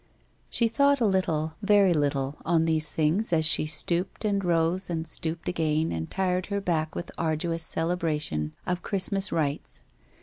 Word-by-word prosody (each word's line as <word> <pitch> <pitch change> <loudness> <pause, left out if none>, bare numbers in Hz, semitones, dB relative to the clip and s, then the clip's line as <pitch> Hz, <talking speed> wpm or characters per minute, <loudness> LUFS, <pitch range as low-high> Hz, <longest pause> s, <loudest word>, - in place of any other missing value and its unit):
She 235 - +3
thought 280 +4 +3
a 235 - +2
little, 165 -6 0
very 200 -3 +4
little, 140 -2 0
on 165 -1 +2
these 155 -1 +1
things 165 +8 +1
as 160 -2 +3
she 155 -1 +3
stooped, 170 +7 -1
and 200 -2 +1
rose, 175 +2 +1
and 165 -2 -2
stooped 160 0 -4
again 160 -2 0
and 80 -1 -4
tired 185 -1 -1
her 200 -1 -1
back 160 -5 -1
with - - -5
arduous 165 +1 -1
celebration 160 - -2
of 180 0 -2
Christmas 195 -1 0
rites. 145 -3 -2
165 Hz, 160 wpm, -27 LUFS, 155-190 Hz, -, very